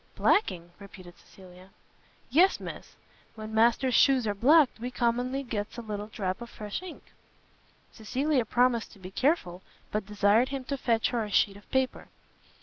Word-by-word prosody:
"Blacking?" 175 Hz, -, +1 dB
repeated 185 Hz, -3 st, -13 dB
Cecilia. 185 Hz, 0 st, -16 dB, 0.6 s
"Yes, 355 Hz, +8 st, +4 dB
Miss; -, -, -9 dB, 0.4 s
when 215 Hz, 0 st, -8 dB
Master's 235 Hz, +3 st, +3 dB
shoes 265 Hz, -2 st, +4 dB
are 205 Hz, -, 0 dB
blacked, 270 Hz, +5 st, +4 dB
we 245 Hz, +2 st, -4 dB
commonly 250 Hz, +3 st, -1 dB
gets 215 Hz, -4 st, -5 dB
a 235 Hz, -, -6 dB
little 210 Hz, -1 st, -5 dB
drap 195 Hz, -1 st, -4 dB
of 235 Hz, -, -8 dB
fresh 210 Hz, -, -6 dB
ink." 370 Hz, -2 st, -10 dB, 0.9 s
Cecilia 260 Hz, +5 st, -1 dB
promised 240 Hz, 0 st, +1 dB
to -, -, -16 dB
be 185 Hz, 0 st, -10 dB
careful, 195 Hz, -, 0 dB, 0.3 s
but 210 Hz, -2 st, -3 dB
desired 210 Hz, +4 st, +2 dB
him 270 Hz, -1 st, -4 dB
to 280 Hz, +2 st, -3 dB
fetch 230 Hz, -4 st, 0 dB
her 235 Hz, -2 st, -1 dB
a 210 Hz, -, -6 dB
sheet 200 Hz, -1 st, +2 dB
of 205 Hz, -, -16 dB
paper. 265 Hz, -1 st, -1 dB
230 Hz, 160 wpm, -28 LUFS, 205-260 Hz, 0.9 s, Yes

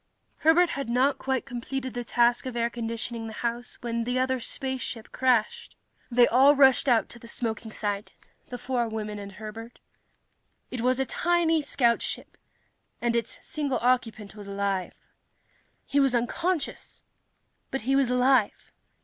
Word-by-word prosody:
Herbert 335 Hz, +3 st, +4 dB
had 275 Hz, -6 st, -4 dB
not 265 Hz, +3 st, +2 dB
quite 265 Hz, -1 st, -1 dB
completed 260 Hz, 0 st, -5 dB
the 245 Hz, 0 st, -3 dB
task 240 Hz, +1 st, +2 dB
of 255 Hz, -, -5 dB
air 235 Hz, 0 st, 0 dB
conditioning 230 Hz, 0 st, -4 dB
the 220 Hz, -, -7 dB
house 240 Hz, +1 st, -3 dB
when 235 Hz, -1 st, -2 dB
the 250 Hz, +2 st, -1 dB
other 260 Hz, 0 st, +1 dB
spaceship 255 Hz, -2 st, -4 dB
crashed. 250 Hz, -4 st, +1 dB, 0.3 s
They 245 Hz, -1 st, +5 dB
all 270 Hz, +4 st, +6 dB
rushed 270 Hz, -1 st, +5 dB
out 235 Hz, -2 st, +3 dB
to 240 Hz, -, -10 dB
the 235 Hz, -, -12 dB
smoking 225 Hz, -1 st, -3 dB
site 205 Hz, -1 st, -3 dB, 0.4 s
the 245 Hz, -, -5 dB
four 245 Hz, -2 st, -1 dB
women 210 Hz, -1 st, -4 dB
and 200 Hz, -1 st, -8 dB
Herbert. 220 Hz, +3 st, -9 dB, 0.9 s
It 250 Hz, -, -3 dB
was 255 Hz, +2 st, +2 dB
a 265 Hz, -, +1 dB
tiny 335 Hz, +3 st, +2 dB
scoutship, 240 Hz, -5 st, 0 dB, 0.6 s
and 235 Hz, -1 st, 0 dB
its 230 Hz, -1 st, -2 dB
single 285 Hz, -4 st, -1 dB
occupant 230 Hz, -5 st, 0 dB
was 205 Hz, -1 st, -10 dB
alive. 200 Hz, -2 st, -2 dB, 0.9 s
He 285 Hz, -, +1 dB
was 270 Hz, -3 st, +3 dB
unconscious, 330 Hz, +8 st, -2 dB, 0.7 s
but 270 Hz, -, -3 dB
he 265 Hz, +5 st, +1 dB
was 275 Hz, -3 st, +3 dB
alive. 250 Hz, -3 st, +2 dB
245 Hz, 150 wpm, -27 LUFS, 230-265 Hz, 0.9 s, all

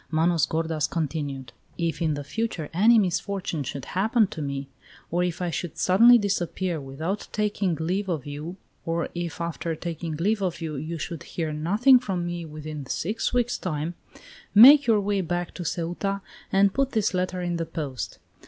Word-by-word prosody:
Manos 165 Hz, -1 st, +2 dB
gordas 160 Hz, -1 st, -1 dB
continued: 145 Hz, -6 st, -3 dB, 0.2 s
"If, 170 Hz, 0 st, -2 dB
in 155 Hz, -3 st, +1 dB
the 145 Hz, -, -5 dB
future, 200 Hz, -3 st, -3 dB
any 220 Hz, +7 st, +6 dB
misfortune 190 Hz, -3 st, -1 dB
should 135 Hz, 0 st, -5 dB
happen 215 Hz, +4 st, +2 dB
to 160 Hz, -, -6 dB
me, 140 Hz, -1 st, -3 dB, 0.4 s
or 175 Hz, +1 st, +1 dB
if 180 Hz, 0 st, -2 dB
I 175 Hz, -, -1 dB
should 170 Hz, +1 st, -4 dB
suddenly 230 Hz, +7 st, +7 dB
disappear 185 Hz, -5 st, -1 dB
without 155 Hz, +9 st, -4 dB
taking 205 Hz, -4 st, 0 dB
leave 185 Hz, +5 st, -2 dB
of 160 Hz, -6 st, -2 dB
you, 150 Hz, +5 st, -6 dB, 0.3 s
or 165 Hz, 0 st, -1 dB
if, 175 Hz, -1 st, -4 dB
after 170 Hz, -1 st, -3 dB
taking 165 Hz, -1 st, -4 dB
leave 200 Hz, +7 st, 0 dB
of 180 Hz, -3 st, -1 dB
you, 160 Hz, -2 st, -4 dB
you 155 Hz, +4 st, -4 dB
should 165 Hz, +1 st, -5 dB
hear 160 Hz, -3 st, -4 dB
nothing 210 Hz, -, +5 dB
from 190 Hz, -8 st, -3 dB
me 175 Hz, -1 st, -4 dB
within 155 Hz, -2 st, -7 dB
six 210 Hz, -, -1 dB
weeks' 245 Hz, -1 st, 0 dB
time, 160 Hz, -1 st, -3 dB, 0.6 s
make 275 Hz, +6 st, +10 dB
your 220 Hz, -2 st, +5 dB
way 200 Hz, 0 st, 0 dB
back 175 Hz, 0 st, -3 dB
to 180 Hz, -, -6 dB
Ceuta 175 Hz, +4 st, -2 dB, 0.3 s
and 195 Hz, 0 st, +4 dB
put 275 Hz, -1 st, 0 dB
this 215 Hz, -3 st, +1 dB
letter 185 Hz, 0 st, -1 dB
in 175 Hz, -1 st, -1 dB
the 165 Hz, -1 st, -3 dB
post. 145 Hz, -6 st, -5 dB
170 Hz, 175 wpm, -25 LUFS, 155-195 Hz, 0.6 s, make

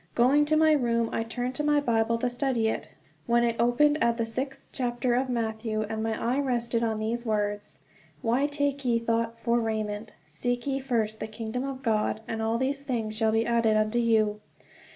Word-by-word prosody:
Going 270 Hz, +5 st, +4 dB
to 310 Hz, +1 st, +2 dB
my 315 Hz, 0 st, +5 dB
room, 235 Hz, -5 st, +2 dB
I -, -, 0 dB
turned 245 Hz, +3 st, -3 dB
to 300 Hz, -, -2 dB
my 295 Hz, 0 st, +3 dB
Bible 230 Hz, -4 st, +1 dB
to 250 Hz, -, 0 dB
study 245 Hz, -2 st, 0 dB
it, -, -, -4 dB, 0.4 s
when 235 Hz, 0 st, +3 dB
it 235 Hz, -1 st, +1 dB
opened 290 Hz, +6 st, +3 dB
at 235 Hz, 0 st, +2 dB
the 230 Hz, -, 0 dB
sixth 265 Hz, +4 st, -5 dB
chapter 245 Hz, -1 st, -1 dB
of 255 Hz, +2 st, +1 dB
Matthew, 220 Hz, -2 st, -1 dB
and 220 Hz, +1 st, -4 dB
my 225 Hz, 0 st, -1 dB
eye 245 Hz, +4 st, 0 dB
rested 235 Hz, -4 st, 0 dB
on 220 Hz, -1 st, 0 dB
these 225 Hz, +2 st, -2 dB
words: 205 Hz, -2 st, -2 dB, 0.4 s
"Why 250 Hz, +5 st, +2 dB
take 285 Hz, -1 st, -1 dB
ye 240 Hz, -2 st, +2 dB
thought 230 Hz, 0 st, -1 dB
for 235 Hz, +1 st, +1 dB
raiment... 215 Hz, -1 st, -3 dB, 0.2 s
seek 245 Hz, +10 st, -2 dB
ye 275 Hz, -1 st, 0 dB
first 225 Hz, -5 st, -1 dB
the 215 Hz, -, -4 dB
kingdom 225 Hz, +3 st, -4 dB
of 270 Hz, -1 st, -5 dB
God, 215 Hz, -1 st, 0 dB
and 225 Hz, 0 st, -3 dB
all 225 Hz, +1 st, +1 dB
these 275 Hz, +3 st, -1 dB
things 230 Hz, -6 st, -2 dB
shall 220 Hz, 0 st, +2 dB
be 225 Hz, +1 st, +2 dB
added 230 Hz, -2 st, +2 dB
unto 215 Hz, +2 st, +1 dB
you." 215 Hz, -3 st, +2 dB
235 Hz, 200 wpm, -27 LUFS, 220-255 Hz, 0.4 s, my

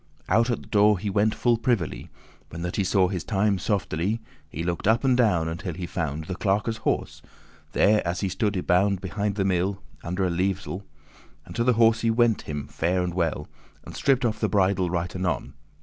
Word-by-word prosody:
Out 115 Hz, +5 st, +3 dB
at 120 Hz, -, -1 dB
the -, -, -16 dB
door 105 Hz, -1 st, +4 dB
he 100 Hz, +3 st, -3 dB
went 105 Hz, +2 st, +2 dB
full 120 Hz, -1 st, +2 dB
privily, 115 Hz, -8 st, -1 dB, 0.4 s
When 85 Hz, +1 st, -7 dB
that 90 Hz, -, -3 dB
he 100 Hz, -, +2 dB
saw 95 Hz, 0 st, +3 dB
his 90 Hz, -3 st, -3 dB
time, 100 Hz, 0 st, +1 dB
softely. 100 Hz, +1 st, -1 dB, 0.3 s
He 80 Hz, -, -5 dB
looked 85 Hz, +2 st, -2 dB
up 115 Hz, +4 st, +3 dB
and 130 Hz, -2 st, +4 dB
down, 100 Hz, -10 st, +2 dB
until 85 Hz, +1 st, -4 dB
he 90 Hz, -, -4 dB
found 80 Hz, -4 st, -3 dB
The 95 Hz, -, -4 dB
clerkes' 105 Hz, +4 st, 0 dB
horse, 110 Hz, -, -2 dB, 0.5 s
there 105 Hz, +1 st, +4 dB
as 85 Hz, +1 st, -2 dB
he 100 Hz, -, 0 dB
stood 105 Hz, +2 st, -1 dB
y 90 Hz, -, -1 dB
bound 95 Hz, +2 st, +2 dB
Behind 100 Hz, +2 st, -2 dB
the 100 Hz, -2 st, 0 dB
mill, 95 Hz, +1 st, 0 dB, 0.2 s
under 90 Hz, +3 st, -1 dB
a 90 Hz, -, 0 dB
levesell:* 95 Hz, +1 st, -1 dB
*arbour<11> -, -, -17 dB, 0.6 s
And -, -, -11 dB
to 115 Hz, -, +1 dB
the 125 Hz, +1 st, +4 dB
horse 115 Hz, 0 st, +4 dB
he 115 Hz, -, +1 dB
went 115 Hz, -1 st, +3 dB
him 75 Hz, -2 st, -5 dB
fair 90 Hz, +2 st, 0 dB
and 90 Hz, -1 st, -3 dB
well, 85 Hz, -3 st, -1 dB, 0.4 s
And -, -, -9 dB
stripped 135 Hz, -2 st, +2 dB
off 110 Hz, -2 st, -1 dB
the -, -, 0 dB
bridle 95 Hz, -2 st, +2 dB
right 85 Hz, +1 st, -2 dB
anon. 90 Hz, -1 st, -2 dB
95 Hz, 210 wpm, -25 LUFS, 90-110 Hz, 0.6 s, door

